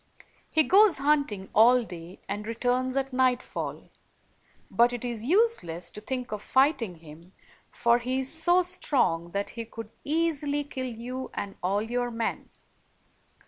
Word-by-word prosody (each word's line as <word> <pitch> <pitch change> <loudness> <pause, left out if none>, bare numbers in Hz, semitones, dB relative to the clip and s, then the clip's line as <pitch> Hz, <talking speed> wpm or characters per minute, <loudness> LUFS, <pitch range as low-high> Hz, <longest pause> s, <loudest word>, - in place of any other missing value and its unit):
He 315 - +4
goes 395 +1 +5
hunting 275 -9 0
all 240 +3 +6
day, 175 -3 -10
and 205 +2 -4
returns 250 +3 -1
at 270 -1 -2
nightfall; 255 -1 -1 0.8
but 240 +1 +4
it 245 0 -4
is 235 -2 -4
useless 315 - +1
to 210 - -10
think 250 +2 -4
of 210 -1 -4
fighting 260 - +2
him, 165 +3 -14 0.4
for 235 0 +2
he 255 +2 -1
is 265 +2 -3
so 345 +3 +3
strong 255 - +2
that 200 0 -2
he 230 - -6
could 225 -1 -9
easily 295 -2 0
kill 260 -2 -5
you 250 +3 -6
and 200 -1 -5
all 195 +3 0
your 245 +2 -2
men." 230 -1 -3
245 Hz, 145 wpm, -27 LUFS, 210-280 Hz, 0.8 s, all